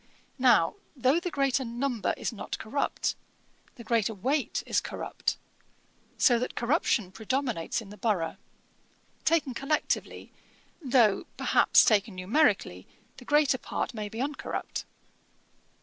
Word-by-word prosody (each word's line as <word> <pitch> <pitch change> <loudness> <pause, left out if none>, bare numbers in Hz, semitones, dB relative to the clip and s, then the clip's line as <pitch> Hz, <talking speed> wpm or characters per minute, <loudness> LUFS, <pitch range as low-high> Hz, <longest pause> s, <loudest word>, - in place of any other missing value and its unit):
Now 245 - +4 0.2
though 265 +4 +3
the 360 - -3
greater 275 -3 +1
number 240 -1 -2
is - - -3
not 220 - -5
corrupt, 280 +6 -1 0.6
the 235 - -10
greater 225 -1 +1
weight 270 +9 -1
is - - +1
corrupt, - - -3 0.8
so 240 -3 +4
that 250 - -4
corruption 235 - +1
predominates 230 -3 -2
in 200 -3 -12
the 210 - -11
borough, 185 -6 -1 0.9
taken 315 -5 +2
collectively, 275 +5 -2 0.5
though, 240 -6 +3
perhaps, - - +5
taken 210 -2 +2
numerically, 190 - +1 0.3
the 250 - -12
greater 290 -3 +3
part - - -3
may 210 -2 -5
be 225 - -7
uncorrupt. 285 +3 -4
240 Hz, 120 wpm, -28 LUFS, 210-275 Hz, 0.9 s, perhaps